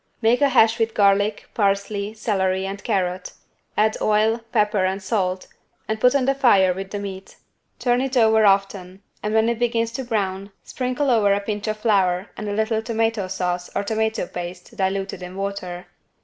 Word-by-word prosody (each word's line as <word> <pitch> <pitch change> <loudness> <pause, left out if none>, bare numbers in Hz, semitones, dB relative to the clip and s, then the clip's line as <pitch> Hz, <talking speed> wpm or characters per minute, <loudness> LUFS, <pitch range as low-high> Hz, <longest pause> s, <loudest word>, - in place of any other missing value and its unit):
Make 235 +3 +2
a 285 - +5
hash 230 -2 +4
with 225 0 0
garlic, 205 +1 +2
parsley, 200 0 -1
celery 190 -3 0
and 195 +1 -6
carrot; 185 -1 -2 0.4
add 215 +1 +2
oil, 215 +2 +2
pepper 210 -2 +2
and 190 +1 0
salt 190 -2 -1 0.4
and 220 0 -2
put 250 +2 +4
on 270 -2 +2
the 275 - +3
fire 200 -9 +4
with 195 +1 -6
the 205 - -4
meat. 195 -1 -7 0.4
Turn 245 0 +1
it 265 0 -1
over 220 -1 +5
often, 195 -1 +1 0.2
and 210 - -2
when 220 0 +4
it 235 -1 -1
begins 230 -1 0
to 260 +3 -4
brown, 200 -4 -2
sprinkle 255 +2 -1
over 215 -4 +3
a - - 0
pinch 210 +1 -4
of 215 0 -1
flour 195 -3 +1
and 210 -1 -5
a - - -2
little 220 +1 0
tomato 225 -3 -1
sauce 180 -1 -3
or - - 0
tomato 220 0 -1
paste 175 +4 -8
diluted 195 -1 -2
in 180 +1 -8
water. 190 -2 -5
205 Hz, 180 wpm, -22 LUFS, 190-225 Hz, 0.4 s, a